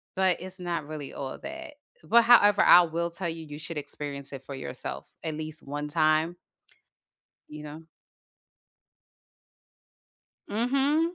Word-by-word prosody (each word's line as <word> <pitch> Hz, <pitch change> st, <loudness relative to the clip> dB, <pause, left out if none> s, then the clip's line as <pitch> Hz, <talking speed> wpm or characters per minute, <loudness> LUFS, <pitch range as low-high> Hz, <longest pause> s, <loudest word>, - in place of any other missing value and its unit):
But, 190 Hz, -1 st, +2 dB
it's 185 Hz, 0 st, -3 dB
not 170 Hz, -4 st, -3 dB
really 150 Hz, -3 st, -7 dB
all 135 Hz, -1 st, -5 dB
that, 325 Hz, -1 st, -8 dB, 0.3 s
but 235 Hz, +1 st, +5 dB
however, 205 Hz, -4 st, +6 dB
I 180 Hz, -, +9 dB
will 170 Hz, 0 st, -2 dB
tell 170 Hz, 0 st, -2 dB
you, 160 Hz, -1 st, -6 dB
you 150 Hz, 0 st, -9 dB
should 165 Hz, -1 st, -6 dB
experience 140 Hz, -1 st, -5 dB
it 135 Hz, -1 st, -8 dB
for 140 Hz, -, -7 dB
yourself -, -, -6 dB, 0.2 s
at 160 Hz, -2 st, -3 dB
least 155 Hz, 0 st, -6 dB
one 145 Hz, +1 st, -4 dB
time. 155 Hz, +2 st, +2 dB, 1.1 s
You 150 Hz, 0 st, -9 dB
know? 150 Hz, +2 st, -9 dB, 2.7 s
Mhm. 275 Hz, -, +1 dB
165 Hz, 135 wpm, -27 LUFS, 150-195 Hz, 2.7 s, I